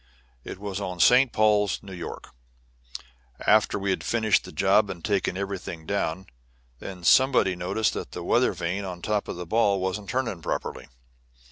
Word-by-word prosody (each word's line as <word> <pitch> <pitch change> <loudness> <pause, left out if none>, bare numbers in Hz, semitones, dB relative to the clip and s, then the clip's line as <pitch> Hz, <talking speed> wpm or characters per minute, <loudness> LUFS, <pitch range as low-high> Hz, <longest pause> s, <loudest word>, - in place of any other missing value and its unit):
It - - -7
was 100 0 -5
on 90 -2 -5
St. 125 +8 +5
Paul's, 105 -2 +2
New 95 -1 -10
York, 90 -2 -8 1.2
after 105 -1 +4
we 100 -1 -1
had - - -2
finished 110 -3 +1
the - - -9
job 100 +2 +3
and 85 -2 -6
taken 100 -3 0
everything 95 -4 -5
down. 95 -1 -2 0.5
Then 90 -2 -8
somebody 125 -3 +4
noticed 95 +5 -1
that - - -6
the - - -6
weather - - +2
vane 90 +4 -3
on 90 -2 -7
top 105 -1 -1
of - - -5
the 90 0 -6
ball 100 +1 +2
wasn't 95 +2 -3
turning 115 -9 -2
properly. - - -4
100 Hz, 165 wpm, -26 LUFS, 90-105 Hz, 1.2 s, St